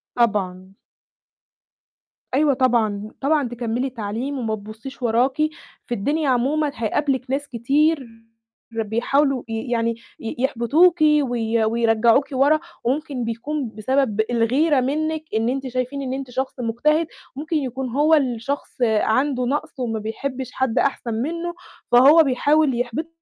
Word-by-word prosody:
طبعًا. 195 -5 0 1.6
أيوه 285 +1 +3
طبعًا، 220 -5 +1
طبعًا 285 -2 +1
تكمِّلي 245 +2 -2
تعليم 245 +4 -4
وما 220 -2 -1
تبُصّيش 220 +6 -10
وراكِ، 245 +3 +2 0.5
في 240 - -4
الدنيا 285 +7 0
عمومًا 280 +4 +1
هيقابلِك 260 +3 -1
ناس 285 +2 -1
كتير 275 +4 +1 0.6
بيحاولوا 240 +5 0
ي 225 +2 -4
يعني 230 0 +1 0.2
ي 225 - -5
يحبطوكِ 290 +7 +3
وي 245 -7 +2
ويرجّعوكِ 230 +3 +3
ورا 280 +4 +3 0.2
وممكن 270 0 -1
بيكون 245 +4 -3
بسبب 220 0 0
الغيرة 260 +6 +2
منِّك 310 +4 -1
إن 225 +2 +1
أنتِ 270 +1 -2
شايفين 255 +2 -3
إن 260 -1 -3
أنتِ 265 -1 -5
شخص 260 +1 -3
مجتهد، 300 +8 +1 0.3
ممكن 310 +4 -4
يكون 260 -2 -3
هو 295 +6 +2
اللي 255 -6 +2
شخص 280 +5 -5
عنده 245 +4 +2
نَقْص 290 +2 -3
وما 225 -3 -2
بيحبّش 255 +4 -5
حد 260 -2 0
أحسن 245 -4 -1
منّه، 335 +9 -3 0.4
فهو 285 +7 +7
بيحاول 280 0 +2
يحبِطِك 245 +6 -2
255 Hz, 130 wpm, -22 LUFS, 230-285 Hz, 1.6 s, فهو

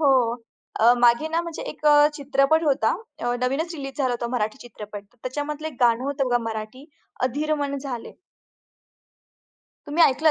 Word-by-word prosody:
हो. 260 -6 +4 0.5
अ, 235 +2 +7
मागे 240 +6 +4
ना 325 +1 0
म्हणजे 335 -2 -6
एक - - -13 0.3
चित्रपट 280 +2 +2
होता. 285 -1 +2 0.5
नवीनच 285 +7 -1
रिलीज 275 -3 -7
झाला 260 -3 +1
होता 240 0 -2
मराठी 215 +3 -2
चित्रपट. 210 -3 -9
तर 205 +4 -33
त्याच्यामधलं 295 +4 -4
एक 295 - -12
गाणं 240 +1 +3
होतं 275 -1 -1
बघा 245 0 +3
मराठी, 220 +5 -6 0.4
अधिर 295 +5 0
मन 285 -1 -2
झाले. 260 -4 -6 1.7
तुम्ही 300 +4 +2
ऐकलं 310 +4 +4
270 Hz, 150 wpm, -24 LUFS, 240-295 Hz, 1.7 s, अ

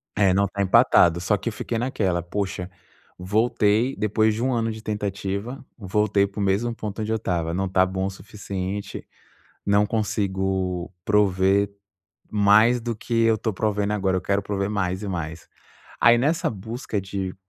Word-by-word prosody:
É, 100 -2 +3
não 100 +1 +3
está 100 0 -3
empatado. 85 -3 +5
Só 90 +4 +1
que 105 +5 -3
eu - - -7
fiquei 115 - -3
naquela: 100 -8 0
poxa, 90 0 -4 0.5
voltei 110 +5 +1
depois 110 +1 +1
de 110 +3 -3
um 130 0 +1
ano 115 -1 0
de 110 0 -8
tentativa, 105 +3 -4
voltei 100 0 +1
para 100 +1 -9
o - - 0
mesmo 100 +5 +1
ponto 110 -1 -5
onde 110 +1 -2
eu - - +2
estava, 85 -6 -2
não 95 +2 -1
tá 95 0 +3
bom 95 0 -2
o - - -1
suficiente. 100 0 -6 0.6
Não 100 +1 +3
consigo 95 -4 -1
prover 100 -1 +3 0.6
mais 110 +4 +4
do 115 0 -3
que 115 +2 -6
eu 115 -1 +4
estou 110 0 -2
provendo 105 +1 -1
agora, 95 -2 +1
eu - - -3
quero 100 +1 0
prover 100 0 -2
mais 95 -1 -2
e - - -4
mais. 85 -3 -5 0.5
Aí 120 +1 +7
nessa 150 +7 +1
busca 110 +1 -4
de 95 -1 -4
100 Hz, 170 wpm, -24 LUFS, 95-110 Hz, 0.6 s, Aí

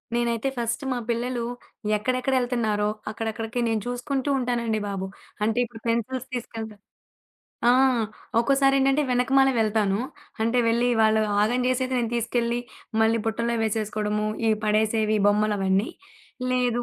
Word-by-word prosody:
నేనైతే 235 +1 0
ఫస్ట్ 235 +3 -2
మా - - -2
పిల్లలు 240 0 -1 0.5
ఎక్కడెక్కడ 255 +4 -1
ఎళ్తున్నారో, 220 -4 0 0.2
అక్కడక్కడికి 225 +2 -4
నేను 225 -1 0
చూసుకుంటూ 260 +3 -2
ఉంటానండి 235 -3 0
బాబు. 195 -1 -3 0.4
అంటే 220 +2 +1
ఇప్పుడు 225 -1 -12
పెన్సిల్స్ 245 +3 -1
తీసుకెళ్తా 225 -2 -6 1.0
ఆ! - - +6 0.7
ఒక్కోసారి 275 +3 +3
ఏంటంటే, 270 +2 +3
వెనకమాలే 265 +2 +3
వెళ్తాను. 210 -3 +2 0.4
అంటే 230 +2 +2
వెళ్లి 235 +2 +2
వాళ్లు 220 0 +4 0.2
ఆగం 240 +4 +1
జేసేది 255 0 0
నేను 230 -2 -1
తీసుకెళ్లి 235 0 0 0.4
మళ్లీ 225 +1 +3
బుట్టలో 235 +1 0
వేసేసుకోవడం. 215 -1 -1 0.3
ఇవి 220 -1 +3
పడేసేవి, 215 0 +2
బొమ్మలవన్నీ. 205 0 +2 0.6
లేదు. 245 -1 +1
230 Hz, 120 wpm, -25 LUFS, 215-245 Hz, 1.0 s, ఆ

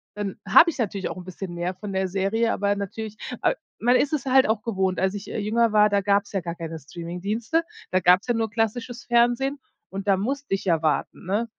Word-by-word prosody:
dann 205 -2 -4
habe 320 - +7
ich 335 - -5
natürlich 200 -5 -2
auch - - -6
'n 180 - -7
bisschen 185 0 -7
mehr 175 +2 -2
von 200 +2 -7
der 190 0 0
Serie, 195 +5 0
aber 200 0 +1
natürlich, 210 +2 -5 0.2
a - - +3 0.3
man 245 +3 +3
ist 290 - 0
es 290 -3 -1
halt 265 0 +5
auch 220 -1 0
gewohnt, 190 -5 -1
als 190 +1 +1
ich, 205 -1 -7
äh, - - -4
jünger 225 +2 +2
war, 210 0 +6
da 200 0 +2
gab's 200 +1 +1
ja 195 - 0
gar 170 -1 -5
keine 165 -1 -6
Streamingdienste, 185 - -3 0.3
da 185 - +3
gab's 180 +3 +4
ja 240 - +2
nur 225 -1 -1
klassisches 230 +2 -2
Fernsehen 240 +4 +2 0.3
und 195 +1 -6
da 195 - +5
musste 275 +3 -3
ich 195 - -1
ja 165 -3 +2
warten, 155 0 -1
ne? 210 +6 -1
205 Hz, 230 wpm, -24 LUFS, 185-230 Hz, 0.3 s, habe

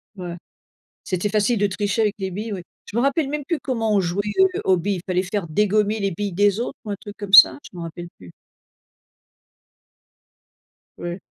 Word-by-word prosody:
Ouais. 175 -3 -6 0.7
C'était 185 +2 -2
facile 215 +2 +1
de 205 - +3
tricher 205 +3 -1
avec 210 -2 +1
les 190 -1 -3
billes, 210 +3 -4
oui? 185 - -5 0.2
Je - - -10
m'en 235 - +2
rappelle 275 +1 +1
même 295 -1 -4
plus 335 0 -1
comment 225 -6 -1
on 200 - +4
jouait, 180 +2 -1 0.2
heu, 380 -1 +3
aux 190 -1 +4
billes. 190 +1 -2
Fallait 185 0 0
faire 195 -1 -3
dégommer 210 +5 +1
les 195 -1 0
billes 200 +2 -4
des 205 +3 +2
autres 240 - -4
ou - - -6
un - - -2
truc 205 0 -10
comme 200 -2 -7
ça? 195 - +10
Je - - -11
m'en 170 - -5
rappelle 175 +1 -7
plus. 90 -2 -13 2.7
Oui. 175 +2 -5
205 Hz, 195 wpm, -22 LUFS, 185-220 Hz, 2.7 s, ça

